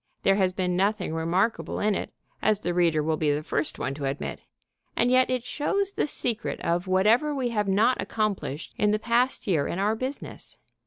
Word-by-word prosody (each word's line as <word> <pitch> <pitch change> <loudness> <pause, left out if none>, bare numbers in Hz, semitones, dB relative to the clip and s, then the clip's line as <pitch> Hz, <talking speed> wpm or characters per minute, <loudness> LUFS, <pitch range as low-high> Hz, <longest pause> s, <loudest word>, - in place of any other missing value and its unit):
There 195 0 +4
has 190 -2 +2
been 180 -1 -1
nothing 195 -2 0
remarkable 175 +7 0
in 210 0 +2
it, - - -3 0.3
as 215 -1 +2
the 175 - -1
reader 165 -3 +2
will 160 0 0
be 150 -2 +1
the 145 +1 -1
first 155 - -2
one 130 - -2
to 140 0 -5
admit. 135 +1 -4 0.5
And 245 +1 +2
yet 255 0 +4
it 255 -2 -1
shows 395 +9 -1
the - - 0
secret 240 -5 -1
of 175 +2 0
whatever 220 +11 +3
we 255 -3 -1
have 210 -3 -1
not 210 +6 +3
accomplished 200 -9 -3
in 210 - +3
the 210 - +2
past 240 +4 +1
year 165 -8 +1
in - - -3
our 205 +3 +2
business. 260 +5 -6
200 Hz, 200 wpm, -26 LUFS, 175-235 Hz, 0.5 s, There